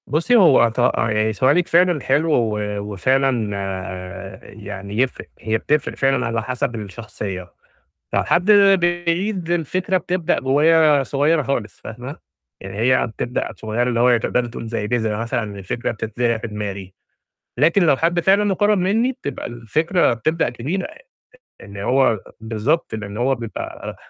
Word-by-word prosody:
بُصّي، 170 Hz, -, +2 dB
هو 155 Hz, -, +6 dB
ط 115 Hz, -, -6 dB, 0.2 s
يعني 110 Hz, -1 st, +1 dB
سؤالِك 140 Hz, -, +2 dB
فعلًا 175 Hz, -3 st, +3 dB
حلو، 150 Hz, +6 st, +1 dB
و 110 Hz, -5 st, +1 dB, 0.2 s
وفعلًا 115 Hz, +3 st, 0 dB
آآ 95 Hz, 0 st, -6 dB
يعني 100 Hz, -1 st, -8 dB
يفرق، 130 Hz, +1 st, -1 dB
هي 110 Hz, 0 st, -1 dB
بتفرق 150 Hz, +6 st, -1 dB
فعلًا 135 Hz, 0 st, +1 dB
على 115 Hz, -1 st, -2 dB
حسب 125 Hz, 0 st, -2 dB
الشخصية، 100 Hz, -3 st, -7 dB, 0.6 s
فحد 180 Hz, +4 st, +2 dB
بعيد 180 Hz, -1 st, +2 dB
الفكرة 185 Hz, +3 st, 0 dB
بتبدأ 180 Hz, -1 st, -1 dB
ب -, -, -14 dB
وهي 150 Hz, +1 st, +4 dB
صغيرة 150 Hz, +4 st, +2 dB
خالص، 120 Hz, -5 st, -3 dB
فاهمة؟ 125 Hz, +6 st, -8 dB, 0.4 s
يعني 95 Hz, +1 st, -8 dB
هي 130 Hz, +4 st, +2 dB
بتبدأ 120 Hz, +2 st, -3 dB
صغيرة، 110 Hz, +2 st, -2 dB
اللي 115 Hz, -1 st, 0 dB
هو 120 Hz, 0 st, +5 dB
تقدري 120 Hz, +2 st, -1 dB
تقولي 115 Hz, 0 st, -7 dB
زَي 110 Hz, -2 st, -3 dB
بذرة 110 Hz, -2 st, -1 dB
مثلًا، 115 Hz, -3 st, -3 dB
الفكرة 95 Hz, +5 st, -3 dB
بتتزع 115 Hz, +1 st, -1 dB
في 110 Hz, -, -6 dB
دماغي. 100 Hz, -3 st, -6 dB, 0.7 s
لكن 165 Hz, +8 st, +4 dB
لو 155 Hz, -5 st, +4 dB
حد 170 Hz, +4 st, +1 dB
فعلًا 195 Hz, +4 st, +3 dB
مقرب 205 Hz, +1 st, +2 dB
مني 220 Hz, +8 st, +1 dB
بتبقى 260 Hz, -, -6 dB
الفكرة 155 Hz, -, 0 dB
بتبدأ 155 Hz, +8 st, 0 dB
كبيرة 150 Hz, +11 st, -3 dB
يعني -, -, -15 dB, 0.6 s
إن 100 Hz, 0 st, -11 dB
هو 120 Hz, +2 st, +2 dB, 0.2 s
بالضبط، 110 Hz, +6 st, -1 dB
لإن 105 Hz, -1 st, -7 dB
هو 130 Hz, +3 st, +1 dB
بيبقى 115 Hz, -2 st, -7 dB
125 Hz, 145 wpm, -20 LUFS, 110-165 Hz, 0.7 s, هو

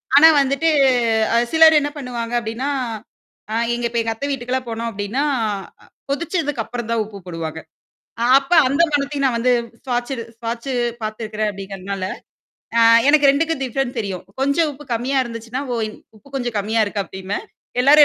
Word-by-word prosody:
ஆனா 300 Hz, +3 st, +9 dB
வந்துட்டு 275 Hz, +4 st, +1 dB, 0.6 s
அ -, -, +3 dB
அ -, -, +5 dB, 0.2 s
சிலர் 320 Hz, -1 st, +7 dB
என்ன 290 Hz, -, -1 dB
பண்ணுவாங்க 240 Hz, -4 st, -5 dB
அப்ப்டின்னா 235 Hz, +5 st, -3 dB, 0.8 s
ஆ -, -, 0 dB, 0.2 s
எங்க 240 Hz, 0 st, -2 dB
இப்ப 235 Hz, -, -1 dB
எங்க 225 Hz, 0 st, -1 dB
அத்த 250 Hz, -, -4 dB
வீட்டுக்கெல்லாம் 255 Hz, -1 st, -2 dB
போனோம் 230 Hz, +1 st, -3 dB
அப்ப்டின்னா 210 Hz, +6 st, -2 dB, 0.9 s
கொதிச்சதுக்கு 295 Hz, -3 st, -1 dB
அப்புறம் 235 Hz, -2 st, -6 dB
தான் 230 Hz, -1 st, +1 dB
உப்பு 205 Hz, -1 st, -10 dB
போடுவாங்க. 165 Hz, -2 st, -5 dB, 0.8 s
அப்ப 275 Hz, +4 st, -9 dB, 0.2 s
அந்த 280 Hz, +5 st, +3 dB
மனத்தையும் 285 Hz, -1 st, 0 dB
நான் 250 Hz, -3 st, +1 dB
வந்து 250 Hz, +2 st, +3 dB, 0.3 s
ஸ்வாச்சு 245 Hz, +1 st, -1 dB, 0.2 s
ஸ்வாட்சு 235 Hz, +3 st, -4 dB, 0.3 s
பார்த்துருக்கிறேன் 215 Hz, 0 st, -3 dB
அப்படிங்கிறனால, 195 Hz, -1 st, -6 dB, 0.7 s
அ -, -, +6 dB, 0.3 s
எனக்கு 290 Hz, -1 st, +6 dB
2 320 Hz, +1 st, 0 dB
டிஃப்ரெண்ட் 255 Hz, 0 st, -2 dB
தெரியும். 195 Hz, -4 st, -4 dB, 0.2 s
கொஞ்சம் 300 Hz, +3 st, +2 dB
உப்பு 290 Hz, +2 st, -12 dB
கம்மியா 255 Hz, +4 st, 0 dB
இருந்துச்சுன்னா, 230 Hz, +2 st, -5 dB
ஓ -, -, -1 dB, 0.4 s
உப்பு 280 Hz, -, -20 dB
கொஞ்சம் 240 Hz, -4 st, -3 dB
கம்மியா 220 Hz, +2 st, +1 dB
இருக்கு 205 Hz, 0 st, -2 dB
அப்படின்பே. 190 Hz, +2 st, -5 dB, 0.4 s
எல்லாரும் 295 Hz, +3 st, +8 dB
240 Hz, 155 wpm, -20 LUFS, 220-280 Hz, 0.9 s, ஆனா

